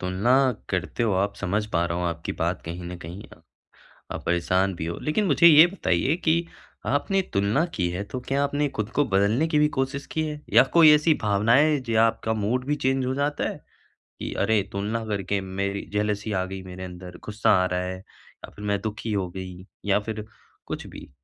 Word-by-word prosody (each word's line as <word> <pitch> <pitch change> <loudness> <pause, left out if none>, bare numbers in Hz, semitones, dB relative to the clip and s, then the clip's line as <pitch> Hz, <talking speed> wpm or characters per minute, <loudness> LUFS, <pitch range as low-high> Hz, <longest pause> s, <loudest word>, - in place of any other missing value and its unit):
तुलना 95 +6 +1 0.4
करते 95 +5 -2
हो 110 -3 +2
आप 100 +2 0
समझ 100 +2 -1
पा 85 - +2
रहा 85 +1 -2
हूँ 90 - -1
आपकी 85 -1 -3
बात - - -1
कहीं 85 +2 -6
न 90 +1 -6
कहीं। 85 +4 -8 0.9
आप - - -5
परेशान 90 +3 +1
भी 80 - -4
हो, 85 +1 -4
लेकिन 155 +8 0
मुझे 170 0 +6
यह 160 +1 +9
बताइए 145 - 0
कि 170 +1 +3 0.4
आपने 190 +8 +1
तुलना 100 +11 +2
की 90 -4 0
है 90 +3 -3
तो 125 +5 -6
क्या 140 +1 +1
आपने 145 +1 0
खुद 110 -1 -2
को 145 - +3
बदलने 100 +10 +2
की 155 -2 +2
भी 150 - +5
कोशिश 135 +1 -2
की 160 - 0
है? 150 -1 -6
या - - +8
कोई 165 -2 +8
ऐसी 150 +2 +3
भावनाएँ 105 +5 +4
हैं 145 -3 0
जो 115 -3 +1
आपका 115 0 +1
मूड 110 +4 -1
भी 145 +2 0
चेंज 135 -2 0
हो 130 - -1
जाता 145 +1 -1
है - - -6 0.6
कि - - -4
अरे 110 -2 +2
तुलना 105 +3 -2
करके 100 -2 -2
मेरी 100 +1 -3
अ, - - -19
जेलसी 105 +1 -1
आ 95 -2 0
गई 95 0 -7
मेरे 95 0 -8
अंदर, 90 -1 -9
गुस्सा 105 0 +1
आ - - +1
रहा 90 0 -1
है 95 0 -4
या 95 - -16
फिर 105 - -8
मैं 100 -1 0
दुखी 110 +1 -4
हो 95 -3 -1
गई 90 0 -8 0.2
या 100 0 +3
फिर 105 0 -5 0.4
कुछ - - -5
भी। - - -11
105 Hz, 210 wpm, -25 LUFS, 95-135 Hz, 0.9 s, यह